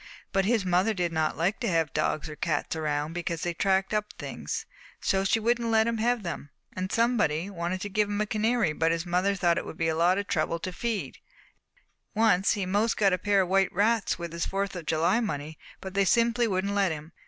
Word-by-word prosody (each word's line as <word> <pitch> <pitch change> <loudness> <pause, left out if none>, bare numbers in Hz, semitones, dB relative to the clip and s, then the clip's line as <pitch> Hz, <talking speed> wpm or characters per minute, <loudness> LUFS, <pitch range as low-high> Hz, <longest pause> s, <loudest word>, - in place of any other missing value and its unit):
But 195 -1 +1
his 220 -2 +1
mother 185 +5 +2
did 175 -2 -1
not 160 -1 0
like 175 +6 0
to 240 - -2
have 165 -4 +1
dogs 155 0 0
or 155 - -8
cats 155 0 -1
around 150 0 -2
because 170 -1 -3
they 175 - -1
tracked 190 +3 +1
up 210 0 -1
things, - - -5 0.3
so 195 0 +1
she 195 +3 +2
wouldn't 235 +1 +1
let 220 0 +4
him 230 -1 -1
have 240 0 +1
them. 170 -4 -5 0.3
And 185 +1 -3
somebody 205 -7 +1
wanted 175 0 -3
to 205 - -4
give 210 +1 +1
him 205 0 -2
a 215 - +1
canary 215 -4 +1
but 165 +1 +1
his 165 +1 -1
mother 180 +3 +1
thought 175 -3 +2
it - - -7
would - - -8
be 165 0 +1
a 160 - 0
lot 175 +3 +3
of 200 - -1
trouble 165 -2 0
to 185 +2 -4
feed. 225 +1 -3 1.0
And - - -4
once 200 -4 +4
he 200 -2 -2
'most 205 +5 +1
got 195 -3 +3
a 180 - 0
pair 200 +1 +3
of 180 - -2
white 195 0 +3
rats 215 +2 +1
with 170 -1 -6
his 170 - -2
Fourth 195 0 -2
of 170 -3 -7
July 170 +7 +2
money, 155 -8 -4 0.2
but 190 -1 -7
they 200 0 +2
simply 235 +3 +3
wouldn't 200 0 -1
let 200 -3 +2
him. 155 +1 -7
190 Hz, 235 wpm, -27 LUFS, 170-210 Hz, 1.0 s, let